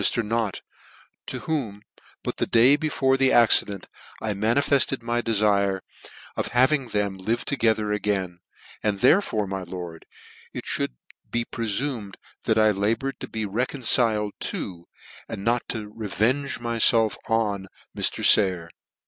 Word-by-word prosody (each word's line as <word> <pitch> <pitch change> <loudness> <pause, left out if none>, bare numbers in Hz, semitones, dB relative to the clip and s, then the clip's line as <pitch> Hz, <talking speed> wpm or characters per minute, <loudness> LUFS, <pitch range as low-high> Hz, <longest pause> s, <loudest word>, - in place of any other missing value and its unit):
ly - - -2
to 120 - +3
Mr. - - -8
Nott, 110 -2 -2 0.7
to - - -4
whom, 115 -10 -3 0.4
but - - -4
the - - -1
day 120 +5 +6
before 140 -3 +1
the 135 0 +3
accident, 105 -4 +4 0.3
I 110 -1 -2
manifefted 125 +5 +1
my 120 +1 0
defire 100 -4 +1 0.5
of - - -2
having 135 +1 +3
them 100 -3 -2
live 115 +5 -2
together 110 -6 +1
again, 95 -4 -2 0.4
and 105 -2 -1
therefore, 125 - +3
my 95 0 -4
lord, 85 -2 -8 0.5
it - - -5
fhould - - -2 0.3
be 120 0 -1
prefumed 115 -2 -3 0.3
I 110 -1 +4
laboured 110 +7 -1
to - - -6
be 110 -1 -3
reconciled 115 -1 +1 0.2
to, 85 -2 -6 0.4
and 100 - -6
not 120 +2 0
to 105 -2 -5
revenge 115 +6 -1
myielf 115 -2 +3
on, 105 -4 0 0.3
Mr. - - 0
Sayer. 90 -5 +4
110 Hz, 140 wpm, -24 LUFS, 100-120 Hz, 0.7 s, day